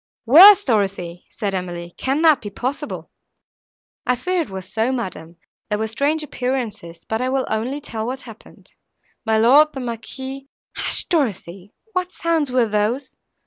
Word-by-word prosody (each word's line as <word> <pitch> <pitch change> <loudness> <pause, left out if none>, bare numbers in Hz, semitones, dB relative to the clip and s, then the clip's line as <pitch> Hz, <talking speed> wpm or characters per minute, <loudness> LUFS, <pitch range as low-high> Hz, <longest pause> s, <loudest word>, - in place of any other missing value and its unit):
"Worse! 375 - +9
Dorothée," 195 -7 -1
said 205 -3 -3
Emily, 175 -2 -5
"can 275 +5 -1
that 315 -4 +5
be 205 - -6
possible?" 270 +8 -5 1.0
"I 250 - +3
fear 360 +8 -1
it 320 - -5
was 190 -1 -7
so, 225 +5 0
madam, 175 -9 -5 0.3
there 210 - 0
were 220 - -1
strange 285 +8 0
appearances. 230 - -4
But 220 +1 -2
I 255 - 0
will 265 0 0
only 235 +6 -2
tell 225 -5 -4
what 260 +2 -4
happened. 225 -3 -15 0.5
My 220 0 +3
lord, 265 +8 +6
the - - -4
Marquis—" 265 +3 -6 0.3
"Hush, - - 0
Dorothée, 200 - -2 0.2
what 365 0 -1
sounds 325 -5 0
were 250 -2 +2
those?" 215 +6 -1
240 Hz, 155 wpm, -21 LUFS, 210-275 Hz, 1.0 s, Worse